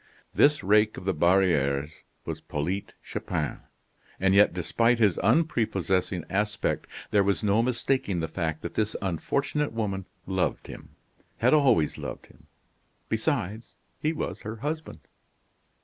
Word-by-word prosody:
This 150 +1 +4
rake 105 +2 +3
of - - -8
the 95 - +1
barrieres 75 -5 +2 0.3
was - - -5
Polyte 90 +7 -3
Chupin. - - -3 0.6
And 95 0 +3
yet 105 +1 +6
despite 115 +8 +1
his 105 -6 +3
unprepossessing 95 - +1
aspect 105 +3 -1 0.2
there 100 -1 +4
was 100 +2 0
no 105 +2 +3
mistaking 120 -5 0
the 80 - -1
fact 80 -1 -3
that - - -5
this 110 0 -1
unfortunate 140 - -1
woman 100 -4 -2 0.2
loved 95 -1 -1
him - - -11 0.4
had 125 +5 +3
always 130 - +3
loved - - -6
him; - - -22 0.6
besides, 110 +6 -2 0.2
he 155 - +1
was 160 - -4
her 110 +2 -5
husband. 150 +7 -5
100 Hz, 135 wpm, -27 LUFS, 90-115 Hz, 0.6 s, yet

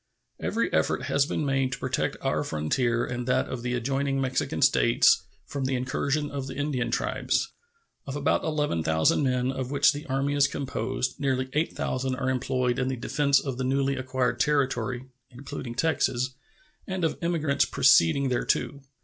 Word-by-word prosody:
Every - - -1
effort - - +1
has 140 0 +1
been 155 - -2
made 135 -2 +1
to - - -3
protect - - -2
our - - 0
frontier 115 - 0
and 120 0 -4
that 125 - +2
of 130 - -5
the 125 +1 -2
adjoining 135 +3 -1
Mexican 130 -1 -1
States - - +4 0.2
from 140 -2 -4
the 130 0 0
incursions 140 +4 -1
of 140 -2 -4
the - - -7
Indian 145 -4 -1
tribes. - - 0 0.6
Of 135 - -4
about 145 +1 +1
11,000 85 - +1
men 130 -1 +1
of 130 -1 -4
which 145 +1 +4
the 145 +3 -7
Army 135 +1 0
is 145 -1 +4
composed, 130 -2 -3
nearly 130 -2 0
8,000 130 -4 -1
are 130 0 -1
employed 125 -1 0
in 130 - 0
the 130 - -1
defense 140 +2 +2
of 135 -2 -5
the - - 0
newly 135 +1 +1
acquired 130 -2 -1
territory 130 -4 0 0.2
(including 125 -1 -7
Texas) 130 -5 +1 0.6
and 190 -2 -3
of 160 - 0
emigrants 155 -5 +1
proceeding 130 +12 +4
thereto. 140 +3 0
130 Hz, 165 wpm, -27 LUFS, 125-140 Hz, 0.6 s, States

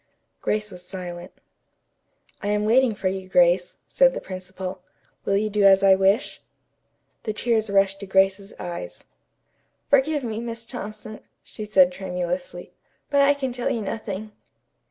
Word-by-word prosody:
Grace 210 0 -1
was 180 0 -10
silent. 180 -1 -7 1.1
"I - - -4
am 210 0 +1
waiting 235 0 +4
for 190 - -2
you, 190 0 -3
Grace," 180 0 +3
said - - +4
the - - -2
principal. 185 0 -7 0.4
"Will 195 - +2
you 215 +1 0
do 210 0 0
as 195 0 +6
I 195 -1 +7
wish?" 195 +5 +1 0.8
The 215 - -3
tears 220 -1 0
rushed 195 0 +2
to 200 - -7
Grace's 195 +1 +2
eyes. 175 -1 -7 0.9
"Forgive 285 +1 +3
me, 225 -2 -3
Miss 230 0 -6
Thompson," 215 -2 -8 0.2
she 215 - -8
said 190 -4 +5
tremulously, 180 -1 -4 0.4
"but 280 -1 +4
I 280 +1 +5
can 265 -3 -3
tell 245 0 -2
you 225 - -2
nothing." 215 0 -5
200 Hz, 150 wpm, -24 LUFS, 185-225 Hz, 1.1 s, I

